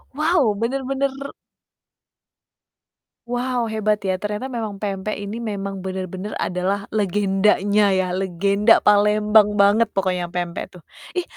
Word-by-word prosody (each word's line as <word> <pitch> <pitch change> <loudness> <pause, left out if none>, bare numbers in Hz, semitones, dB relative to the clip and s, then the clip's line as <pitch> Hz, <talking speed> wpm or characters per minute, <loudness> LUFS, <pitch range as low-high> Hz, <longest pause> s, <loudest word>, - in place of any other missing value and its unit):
Wow, 305 - +2
benar-benar 270 +3 -1 2.2
Wow, 245 -1 -2
hebat 215 -1 0
ya, 190 -1 -1
ternyata 210 +6 -4
memang 220 -5 -5
pempek 200 0 -3
ini 205 +2 -6
memang 200 -4 -4
benar-benar 190 +1 -5
adalah 190 +3 -2
legendanya 200 0 +2
ya, 185 -1 0
legenda 195 +4 +2
Palembang 210 0 +4
banget 205 +3 +4
pokoknya 185 -2 0
pempek 175 +2 -5
tuh. 180 - -13 0.3
Ih, 360 - 0
205 Hz, 110 wpm, -21 LUFS, 190-220 Hz, 2.2 s, Palembang